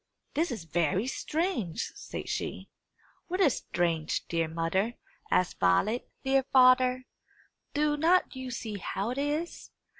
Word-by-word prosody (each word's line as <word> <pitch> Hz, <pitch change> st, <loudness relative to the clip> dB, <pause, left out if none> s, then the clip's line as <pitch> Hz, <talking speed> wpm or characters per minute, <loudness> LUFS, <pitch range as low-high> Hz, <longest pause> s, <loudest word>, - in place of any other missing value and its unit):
"This 330 Hz, +3 st, +1 dB
is 220 Hz, -8 st, -4 dB
very 170 Hz, +5 st, +1 dB
strange!" 300 Hz, -, -2 dB
said -, -, -7 dB
she. -, -, -4 dB, 0.6 s
"What 365 Hz, +2 st, -2 dB
is 310 Hz, -10 st, +4 dB
strange, 165 Hz, -3 st, -1 dB
dear 165 Hz, -1 st, 0 dB
mother?" 170 Hz, +8 st, -1 dB, 0.3 s
asked 180 Hz, -, +1 dB
Violet. 200 Hz, -, +2 dB
"Dear 270 Hz, 0 st, +3 dB
father, 255 Hz, 0 st, +5 dB, 0.7 s
do 295 Hz, 0 st, +2 dB
not 340 Hz, +1 st, +3 dB
you 260 Hz, 0 st, -5 dB
see 220 Hz, -4 st, -5 dB
how 200 Hz, +4 st, -2 dB
it 255 Hz, -, -3 dB
is? 300 Hz, +4 st, -2 dB
250 Hz, 130 wpm, -29 LUFS, 175-290 Hz, 0.7 s, father